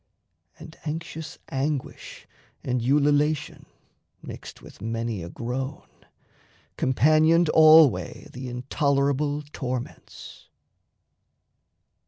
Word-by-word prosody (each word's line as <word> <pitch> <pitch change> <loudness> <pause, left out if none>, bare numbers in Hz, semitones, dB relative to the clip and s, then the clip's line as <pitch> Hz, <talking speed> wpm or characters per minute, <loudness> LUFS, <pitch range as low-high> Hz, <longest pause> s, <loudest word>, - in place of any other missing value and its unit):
And 160 0 -12
anxious 160 0 -6
anguish 135 0 -4 0.4
and 125 -1 -1
ululation 145 +3 +1 0.6
(mixed - - -10
With - - -15
many 115 -2 -3
a 85 - -7
groan) 130 - -5 0.9
companioned 155 +5 +3
alway 155 - +5
The 125 0 -7
intolerable 140 +3 0
torments. 125 -4 -7
140 Hz, 75 wpm, -25 LUFS, 125-155 Hz, 0.9 s, alway